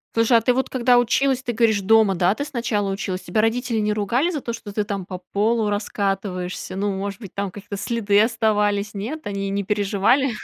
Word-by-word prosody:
Слушай, 230 +1 +4
а - - +2
ты 245 +2 +2
вот 265 +1 -1
когда 245 -1 +3
училась, 260 +2 +1
ты 240 -2 -3
говоришь, 220 -3 +2
дома, 220 0 +4
да, 180 +2 +2
ты 285 - -3
сначала 235 -8 -1
училась? 190 -2 -3
Тебя 215 - 0
родители 230 +1 0
не 210 0 +1
ругали 235 - +1
за 310 -5 -3
то, 235 - -4
что 220 -2 -8
ты 210 +1 -1
там 200 -3 -4
по 185 - -5
полу 210 +4 0
раскатываешься? 195 -3 -3
Ну, 200 +1 -1
может 200 +1 -4
быть, 200 -6 -10
там 200 0 -2
какие-то 205 +1 -8
следы 210 -1 +2
оставались? 210 -2 +1
Нет? 245 +11 -5
Они 200 -1 -3
не 200 +1 -1
переживали? 210 +6 +2
210 Hz, 205 wpm, -22 LUFS, 200-235 Hz, -, Слушай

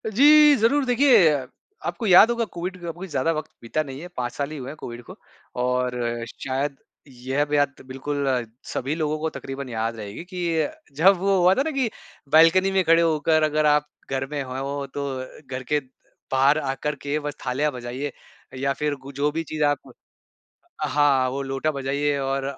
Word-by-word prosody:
जी, 295 +6 +7
ज़रूर 270 +5 +2
देखिए, 245 - +5 0.5
आपको 235 - -3
याद 190 +4 +8
होगा 235 -1 0
कोविड 180 +2 -4
का 170 -1 -4
कोई 180 +4 -8
ज़्यादा 150 -1 0
वक़्त 155 0 -5
बीता 135 +7 -1
नहीं 135 -2 -8
है, 175 - -7
5 120 -1 -2
साल 140 +2 -3
ही 155 - -6
हुए 130 -1 -6
हैं 145 - -7
कोविड 120 -3 -8
को। - - -11 0.5
और 125 0 0 0.3
शायद 135 +3 -3 0.3
यह 130 +2 -2
बात 145 -2 +1
बिल्कुल 140 +2 -3 0.5
सभी 135 +4 -2
लोगों 155 -1 -1
को 160 +1 -1
तकरीबन 135 0 -6
याद 115 0 -2
रहेगी 105 +6 -7
कि 180 0 -10
ये 170 - 0 0.3
जब 185 +6 +5
वो 195 +2 +2
हुआ 180 +1 +6
था - - +2
ना 320 - -1
कि, 270 -5 0 0.4
बालकनी 165 +5 +6
में 190 -1 +2
खड़े 165 0 +5
होकर 155 -1 +2
अगर 155 0 +2
आप 150 0 +3 0.2
घर 135 0 -1
में 145 -1 -2
हो, 135 +2 -4
तो 140 0 -5
घर 130 - -5
के 150 +3 +1 0.5
बाहर 135 +3 +4
आकर 145 +1 -2
के 145 +1 -1
बस 145 -1 -5
थालियाँ 145 +4 0
बजाइए 125 +3 -5 0.5
या 135 +1 0
फिर 150 +1 -1
उ 140 - -8
जो 145 +2 +1
भी 165 +2 -2
चीज 155 -1 -3
आप 145 -2 0 0.9
हाँ, 140 -2 +3
वो 135 +2 -3
लोटा 135 +3 -1
बजाइए 140 +1 -1
और 135 0 -1
145 Hz, 185 wpm, -24 LUFS, 135-165 Hz, 0.9 s, याद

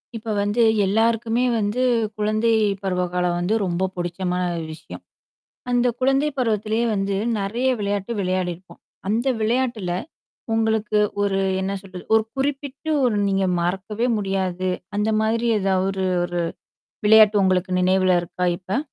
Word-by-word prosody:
இப்ப 220 -1 -4
வந்து 205 +4 +1 0.2
எல்லாருக்குமே 225 +3 +1 0.2
வந்து 210 +4 -1 0.4
குழந்தை 215 +2 +1 0.3
பருவ 180 -2 0
காலம் 180 -1 +1
வந்து 180 +5 0
ரொம்ப 180 +1 0
பிடிச்சமான 180 +1 -2 0.3
விஷயம். 155 - -10 0.7
அந்த 245 0 +2
குழந்தை 270 +3 +2
பருவத்திலயே 220 -1 0
வந்து 195 0 -1 0.2
நெறைய 225 +6 -1
விளையாட்டு 205 +1 -2
விளையாடிருப்போம். 185 -1 -3 0.3
அந்த 225 +6 0
விளையாட்டுல 225 -4 0 0.6
உங்களுக்கு 220 -1 +1 0.2
ஒரு 195 -1 +1 0.2
என்ன 190 +1 -2
சொல்றது, 185 -2 -10
ஒரு 220 -1 +4
குறிப்பிட்டு 280 +2 -3
ஒரு 235 -4 +2
நீங்க 195 0 +1 0.2
மறக்கவே 195 +6 -1
முடியாது. 190 -2 -1 0.3
அந்த 210 +1 +1
மாதிரி 225 +2 0
ஏதாவது 190 -1 +1
ஒரு 190 -1 -2 0.2
1 175 0 -2 0.7
விளையாட்டு 215 0 +7
உங்களுக்கு 185 0 +1
நினைவில 185 0 +3
இருக்கா 175 +1 -4
இப்ப? 190 +5 -2
205 Hz, 125 wpm, -22 LUFS, 185-225 Hz, 0.7 s, விளையாட்டு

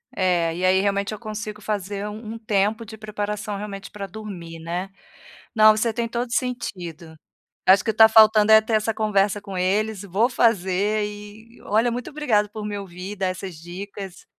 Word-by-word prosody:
É, 175 -3 +1
e 185 - 0
aí 190 +1 +4
realmente 200 +1 0
eu 215 - -7
consigo 215 -1 -6
fazer 205 0 -3
um 215 +1 -8
um - - -6
tempo 215 +1 0
de 220 +1 -10
preparação 210 -1 -4
realmente 200 -1 -7
pra 200 -1 -6
dormir, 175 -5 -8
né. 175 +4 -4 0.7
Não, 215 0 +7
você 225 +1 0
tem 235 0 -2
todo 235 +1 -3
sentido. 175 - -4 0.5
Acho 190 +1 +6
que 220 - +1
está 220 +1 +7
faltando 215 -1 +6
é 220 - +10
ter 220 +1 -4
essa 215 +1 +1
conversa 205 -2 +1
com 195 -2 -7
eles, 205 +3 0
vou 200 +6 +1
fazer 210 -2 +1
e 210 +2 -11
olha, 225 +4 +2
muito 245 +1 -4
obrigada 235 -9 +1
por 210 0 -7
me 205 -1 -3
ouvir, 190 +1 -7
dar 190 -1 -1
essas 185 -1 -5
dicas. 185 +2 -9
210 Hz, 180 wpm, -23 LUFS, 190-220 Hz, 0.7 s, é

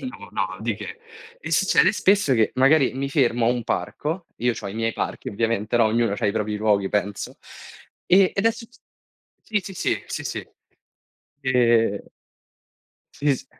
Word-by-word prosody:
No, 255 - -8
no - - -2
di - - -1
che. 450 - -8 0.4
E - - -7
succede - - +4
spesso 195 -7 +3
che 110 -2 +2
magari 135 +1 +4
mi 135 +1 -3
fermo 120 -5 +2
a - - +4
un 120 -1 -1
parco- 165 +4 -3
io 120 +1 +1
c'ho 105 - -6
i 100 - -7
miei 115 0 -1
parchi - - -4
ovviamente 115 +1 -1
no, 115 - +5
ognuno 115 -1 +1
c'ha 105 - -1
i 100 - +1
propri 105 -1 -2
luoghi 105 -2 +1
penso- 105 0 -2 0.7
e 190 +1 +5
ed 195 +3 +1
succe 230 +1 -8 0.6
sì, 210 -2 0
sì, 195 - -8
sì, - - -1
sì, - - -5
sì. - - -5 0.9
Ehm 115 -5 +2 1.1
Sì 145 -1 +1
s 130 - -12
120 Hz, 170 wpm, -23 LUFS, 110-155 Hz, 1.1 s, no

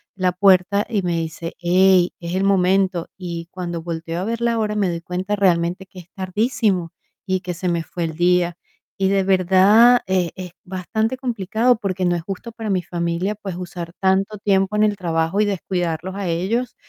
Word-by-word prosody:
la 185 -2 +1
puerta 195 +2 +3
y 205 -5 0
me 175 -1 0
dice: 165 +1 -4
"Ey, 180 +1 +4
es 170 0 -5
el 190 +1 0
momento", 190 -2 +2
y 170 -2 -6
cuando 175 -3 -5
volteo 165 0 -4
a - - -2
ver 230 +1 -3
la 235 -1 +1
hora 215 -1 0
me 200 -3 +1
doy 170 -1 -3
cuenta 185 +4 -3
realmente 180 -1 +1
que 185 0 -13
es 175 - -13
tardísimo 190 -2 0 0.3
y 185 -1 0
que 180 -1 -5
se 180 +1 -3
me 170 -1 0
fue 170 +1 -5
el 160 -1 -3
día. 175 0 +2 0.4
Y 195 - +1
de 195 0 +2
verdad, 195 +6 +5
eh, 185 -2 +1
es 185 -2 -7
bastante 220 +6 -2
complicado 235 -1 +1
porque 195 -4 -3
no 175 -1 +2
es - - -5
justo 195 +6 -7
para 220 -1 -6
mi 185 -2 0
familia, 170 +3 -2
pues, 195 -3 -6
usar 175 -1 -7
tanto 195 +2 +1
tiempo 195 0 +1
en 210 - +3
el 210 -2 +2
trabajo 165 +1 -1
y 210 - +4
descuidarlos 185 -2 -2
a 200 -2 -3
ellos, 205 +9 -1
185 Hz, 195 wpm, -21 LUFS, 175-200 Hz, 0.4 s, verdad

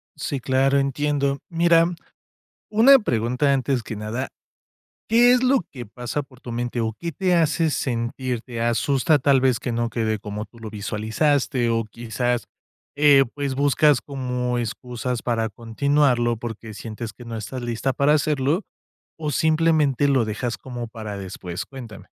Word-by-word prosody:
Sí, 140 - -3
claro, 135 +2 +2
entiendo. 140 0 0
Mira, 170 0 +4 0.9
una 250 +6 +7
pregunta 125 - +1
antes 135 -2 0
que 110 - -6
nada, 110 +5 -4 0.8
¿qué 240 +2 +6
es 250 0 +2
lo 260 -3 +4
que 125 -4 -7
pasa 125 +6 -4
por 130 -2 -17
tu 120 - -7
mente 120 +1 -3
o 110 -1 -1
qué 170 +7 -5
te 180 +4 0
hace 160 0 +2
sentirte 120 -1 -3
asusta 135 +5 +2
tal 135 -1 +3
vez 130 -4 +2
que 125 - -3
no 115 0 -1
quede 110 -2 -1
como 105 +1 -5
tú 115 - -19
lo 110 -1 -7
visualizaste 115 +5 0
o 115 -1 0
quizás, 120 +2 -2 0.5
eh, 145 -2 +6
pues, 140 -2 -3
buscas 145 0 +4
como 125 -3 -2
excusas 120 +1 -4
para 115 -2 0
continuarlo 120 +1 +1
porque 115 -1 -7
sientes 110 +1 -7
que 120 - -13
no 115 -1 -6
estás 115 +4 -5
lista 120 +3 -1
para 140 +3 +3
hacerlo 150 +3 +1 0.6
o 150 -2 -3
simplemente 155 -3 +2
lo 135 -4 +3
dejas 115 +3 -3
como 120 -3 -6
para 110 -3 -7
después? 90 -2 -6
Cuéntame. 120 -7 -10
125 Hz, 155 wpm, -23 LUFS, 115-145 Hz, 0.9 s, una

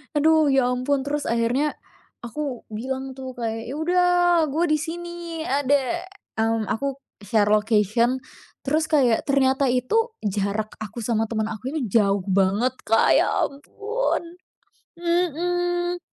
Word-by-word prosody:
Aduh, 315 +1 +4
ya 270 -3 +3
ampun. 265 +2 0
Terus 290 +1 -2
akhirnya, 235 +6 +1 0.5
aku 255 +1 -5
bilang 265 +4 -4
tuh 260 -1 -7
kayak, 225 -1 -4
"Ya, 270 - -4
udah, 355 +3 +2 0.4
gue 305 +4 0
disini 335 +1 -3
ada," 285 +4 0 0.3
mmm, 225 0 +1
aku 275 +4 -1 0.2
share 205 +1 +1
location, 215 +4 +2 0.4
terus 310 +3 +1
kayak 265 -8 +2
ternyata 270 0 +2
itu 445 - +1
jarak 205 +1 -1
aku 220 +2 -7
sama 225 0 0
temen 220 -1 -2
aku 235 +5 -5
ini 315 - -1
jauh 200 -1 +3
banget, 200 +7 +2
Kak, 225 +1 +4
ya - - +4 0.2
ampun. 350 - -3 0.6
Mhm. 350 +1 0
265 Hz, 125 wpm, -23 LUFS, 225-320 Hz, 0.6 s, Aduh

